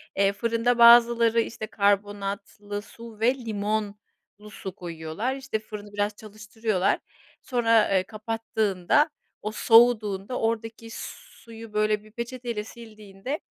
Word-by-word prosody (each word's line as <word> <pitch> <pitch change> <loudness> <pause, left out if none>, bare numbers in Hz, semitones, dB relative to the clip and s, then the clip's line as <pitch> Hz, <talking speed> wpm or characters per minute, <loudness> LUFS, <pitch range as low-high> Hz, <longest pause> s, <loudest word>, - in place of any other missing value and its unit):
Eee, 200 0 +3
fırında 230 +3 0
bazıları, 235 -1 +7
işte, 220 -1 -5
karbonatlı 205 0 -1
su 220 +1 -13
ve 240 +4 +3
limonlu 215 -3 -2 0.5
su 190 -3 -8
koyuyorlar. 170 +7 -4
İşte 265 -5 -3
fırını 210 -1 -10
biraz 205 0 -1
çalıştırıyorlar. 215 -2 -2 0.4
Sonra, 230 -3 +3
eee, 190 -2 +2
kapattığında 220 - 0 0.3
o 215 - -3
soğuduğunda 225 -1 +3
oradaki 225 0 -3
suyu 230 - -10
böyle 210 0 +1
bir 215 - -17
peçeteyle 235 -1 -5
sildiğinde 215 +3 -8
215 Hz, 110 wpm, -26 LUFS, 205-230 Hz, 0.5 s, bazıları